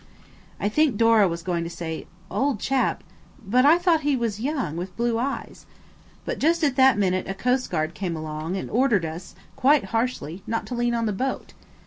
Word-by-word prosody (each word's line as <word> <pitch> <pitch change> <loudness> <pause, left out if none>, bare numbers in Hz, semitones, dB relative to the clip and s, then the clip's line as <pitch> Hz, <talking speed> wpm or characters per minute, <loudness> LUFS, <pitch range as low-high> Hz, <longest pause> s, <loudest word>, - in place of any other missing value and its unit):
I - - 0
think 275 +1 +2
Dora 225 -3 +5
was 170 -1 -4
going 175 -2 -1
to 170 - -5
say, 165 -1 -6 0.2
"Old 275 -5 0
chap–but 255 -1 -1
I 320 +3 +7
thought 350 -3 +2
he 290 -1 +1
was 230 -4 -2
young 260 - -2
with 180 +2 -6
blue 235 -1 0
eyes?" 275 +3 -4 0.6
but - - -3
just 330 +2 +2
at 280 -4 +2
that 265 -3 +5
minute 185 -2 0
a 195 - -3
coastguard 195 -9 0
came 180 -3 -3
along 155 +3 -4
and - - -4
ordered 230 -7 +2
us 165 +3 -7 0.2
quite 280 +2 +4
harshly 225 - -2
not 225 0 -2
to - - -6
lean 240 0 0
on 230 -1 0
the 210 - 0
boat. 260 +7 -3
230 Hz, 185 wpm, -24 LUFS, 180-265 Hz, 0.6 s, I